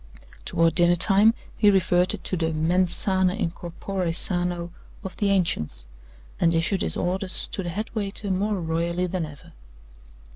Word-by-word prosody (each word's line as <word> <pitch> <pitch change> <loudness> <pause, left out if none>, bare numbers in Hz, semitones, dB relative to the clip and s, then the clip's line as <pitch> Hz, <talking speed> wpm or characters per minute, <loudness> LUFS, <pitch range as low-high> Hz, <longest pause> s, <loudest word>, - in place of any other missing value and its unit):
Toward 165 -1 +1
dinner 175 0 +3
time 205 +5 +4 0.2
he 210 - +4
reverted 185 -2 +1
to - - -3
the 165 -2 -1
mens 170 +3 +1
sana 190 -1 +1
in 185 -6 -2
corpore 180 +1 -4
sano 175 -1 +2 0.3
of 190 - -7
the 205 -2 0
ancients, 165 - -1 0.5
and 165 -1 +2
issued 175 +4 0
his - - -2
orders 185 +1 +1
to 195 - -4
the 175 - -5
head 215 +6 -5
waiter 205 -2 -3
more 200 +2 -1
royally 170 +2 -1
than 180 -2 -3
ever. 145 -2 -15
180 Hz, 155 wpm, -24 LUFS, 170-195 Hz, 0.5 s, time